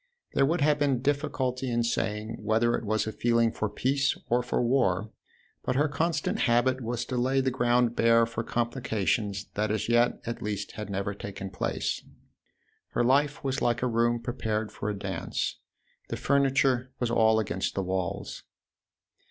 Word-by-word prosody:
There 135 Hz, -, +3 dB
would 165 Hz, +1 st, 0 dB
have 150 Hz, 0 st, +3 dB
been 135 Hz, -4 st, +1 dB
difficulty 135 Hz, -3 st, -1 dB
in 120 Hz, 0 st, +1 dB
saying 110 Hz, 0 st, -2 dB
whether 110 Hz, +2 st, +2 dB
it -, -, -1 dB
was 110 Hz, +1 st, +1 dB
a 110 Hz, -, -3 dB
feeling 115 Hz, 0 st, +2 dB
for 110 Hz, -, -2 dB
peace 135 Hz, +6 st, +1 dB
or 120 Hz, +1 st, +4 dB
for 125 Hz, -, -1 dB
war, 110 Hz, -5 st, +1 dB, 0.5 s
but 125 Hz, -, -1 dB
her 145 Hz, +3 st, +3 dB
constant 155 Hz, +2 st, -1 dB
habit 130 Hz, +1 st, +2 dB
was 120 Hz, 0 st, -2 dB
to 130 Hz, -, -3 dB
lay 130 Hz, +2 st, +2 dB
the 130 Hz, 0 st, +1 dB
ground 120 Hz, -1 st, +2 dB
bare 115 Hz, 0 st, +5 dB
for 115 Hz, 0 st, -4 dB
complications 110 Hz, -4 st, -1 dB
that 105 Hz, +1 st, 0 dB
as 110 Hz, +1 st, -1 dB
yet 120 Hz, +1 st, +3 dB
at 115 Hz, 0 st, -4 dB
least 105 Hz, -1 st, -3 dB
had 105 Hz, -2 st, -7 dB
never 100 Hz, +1 st, -2 dB
taken 95 Hz, -1 st, -7 dB
place. 90 Hz, -, -2 dB, 0.9 s
Her -, -, +2 dB
life 140 Hz, +3 st, +2 dB
was 135 Hz, 0 st, -1 dB
like 120 Hz, 0 st, +1 dB
a -, -, +3 dB
room 120 Hz, 0 st, +2 dB
prepared 110 Hz, -2 st, -2 dB
for 105 Hz, -, -4 dB
a 105 Hz, -, -3 dB
dance: -, -, -3 dB, 0.5 s
the -, -, -3 dB
furniture 135 Hz, -2 st, +2 dB
was 120 Hz, -2 st, 0 dB
all 110 Hz, -1 st, +4 dB
against 95 Hz, -3 st, -2 dB
the 95 Hz, -, 0 dB
walls. 95 Hz, -1 st, -3 dB
120 Hz, 170 wpm, -28 LUFS, 110-130 Hz, 0.9 s, bare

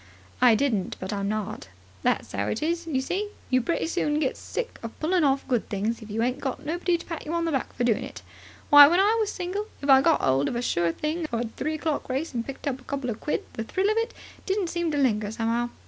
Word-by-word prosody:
"I 245 Hz, -3 st, +7 dB
didn't. 220 Hz, -7 st, 0 dB
But 190 Hz, +2 st, -4 dB
I'm 200 Hz, 0 st, -1 dB
not." 215 Hz, -, -3 dB, 0.3 s
"That's -, -, 0 dB
'ow 100 Hz, +1 st, -1 dB
it 225 Hz, -, -2 dB
is, 335 Hz, +1 st, -1 dB
you 265 Hz, -5 st, 0 dB
see. 390 Hz, +9 st, -2 dB, 0.2 s
You 255 Hz, 0 st, +4 dB
pretty 335 Hz, +8 st, -1 dB
soon 305 Hz, -3 st, 0 dB
gets 280 Hz, -4 st, -1 dB
sick 480 Hz, 0 st, -5 dB
of 230 Hz, -1 st, -8 dB
pulling 345 Hz, +2 st, +2 dB
off 275 Hz, -1 st, +2 dB
good 245 Hz, -4 st, 0 dB
things, 215 Hz, +4 st, -2 dB
if 220 Hz, -, -10 dB
you 220 Hz, +2 st, -1 dB
ain't 250 Hz, +2 st, 0 dB
got 275 Hz, +2 st, -4 dB
nobody 345 Hz, +3 st, 0 dB
to -, -, -11 dB
pat 330 Hz, -2 st, -5 dB
you 320 Hz, +3 st, -3 dB
on 335 Hz, 0 st, 0 dB
the 330 Hz, -, 0 dB
back 270 Hz, -4 st, -1 dB
for 245 Hz, -, -2 dB
doing 235 Hz, -3 st, +3 dB
of -, -, -6 dB
it. -, -, -12 dB, 0.5 s
Why, 290 Hz, 0 st, +11 dB
when 345 Hz, +4 st, +3 dB
I 415 Hz, +3 st, +4 dB
was 430 Hz, -1 st, 0 dB
single, 380 Hz, +4 st, -3 dB
if 280 Hz, 0 st, +2 dB
I 265 Hz, 0 st, +8 dB
got 325 Hz, +2 st, +3 dB
'old 135 Hz, +2 st, +3 dB
of -, -, -2 dB
a 240 Hz, -, -1 dB
sure 170 Hz, -7 st, +1 dB
thing 310 Hz, -, -2 dB
for 235 Hz, -4 st, -2 dB
the 230 Hz, -, -5 dB
three 310 Hz, +7 st, -3 dB
o'clock 310 Hz, -3 st, -2 dB
race 270 Hz, +5 st, -2 dB
and 235 Hz, -1 st, -1 dB
picked 275 Hz, +3 st, -7 dB
up 260 Hz, -2 st, -2 dB
a -, -, -20 dB
couple 275 Hz, -3 st, -3 dB
of 215 Hz, -, -6 dB
quid, 300 Hz, -, -2 dB
the 225 Hz, -, -4 dB
thrill 380 Hz, -, +1 dB
of 435 Hz, -, -1 dB
it 455 Hz, +1 st, 0 dB, 0.4 s
didn't 385 Hz, -2 st, 0 dB
seem 345 Hz, -1 st, -1 dB
to 295 Hz, -, -1 dB
linger 215 Hz, -7 st, +2 dB
somehow. 230 Hz, +2 st, -1 dB
275 Hz, 265 wpm, -26 LUFS, 230-335 Hz, 0.5 s, Why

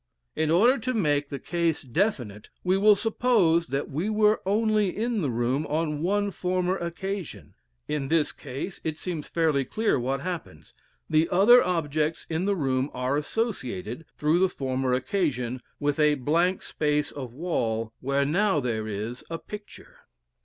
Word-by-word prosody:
In 160 Hz, -1 st, 0 dB
order 230 Hz, -, +5 dB
to 255 Hz, +2 st, -2 dB
make 145 Hz, -8 st, +1 dB
the 140 Hz, -, -4 dB
case 170 Hz, 0 st, -1 dB
definite, 125 Hz, -, -1 dB
we 185 Hz, +1 st, +2 dB
will 205 Hz, +2 st, +6 dB
suppose 200 Hz, -7 st, +2 dB
that 135 Hz, +2 st, -3 dB
we 165 Hz, +10 st, -1 dB
were 215 Hz, 0 st, +3 dB
only 215 Hz, -1 st, +2 dB
in 230 Hz, -1 st, 0 dB
the 145 Hz, -, 0 dB
room 125 Hz, +5 st, 0 dB
on 150 Hz, -1 st, -1 dB
one 200 Hz, +3 st, +1 dB
former 185 Hz, 0 st, 0 dB
occasion. 190 Hz, +1 st, -5 dB, 0.3 s
In 145 Hz, -3 st, -2 dB
this 155 Hz, 0 st, +2 dB
case 140 Hz, +7 st, -7 dB
it 155 Hz, -1 st, -2 dB
seems 165 Hz, -5 st, -5 dB
fairly 155 Hz, -5 st, +1 dB
clear 215 Hz, -, 0 dB
what 135 Hz, +2 st, -1 dB
happens. 170 Hz, -, -6 dB, 0.3 s
The 160 Hz, +1 st, +2 dB
other 240 Hz, +7 st, +7 dB
objects 155 Hz, -3 st, -1 dB
in 165 Hz, +3 st, 0 dB
the 200 Hz, 0 st, +2 dB
room 135 Hz, -4 st, 0 dB
are 125 Hz, +2 st, 0 dB
associated, 145 Hz, -, -3 dB
through 155 Hz, +3 st, +2 dB
the 190 Hz, 0 st, +3 dB
former 130 Hz, -4 st, -2 dB
occasion, 130 Hz, -3 st, -1 dB, 0.2 s
with 145 Hz, 0 st, 0 dB
a 150 Hz, -1 st, +4 dB
blank 165 Hz, +7 st, +1 dB
space 150 Hz, -1 st, 0 dB
of 130 Hz, -4 st, -7 dB
wall 115 Hz, -7 st, -2 dB
where 140 Hz, +1 st, +1 dB
now 180 Hz, +3 st, +2 dB
there 110 Hz, -4 st, -2 dB
is 110 Hz, +4 st, -5 dB
a 165 Hz, -, -3 dB
picture. 210 Hz, +4 st, -11 dB
160 Hz, 160 wpm, -26 LUFS, 135-190 Hz, 0.3 s, other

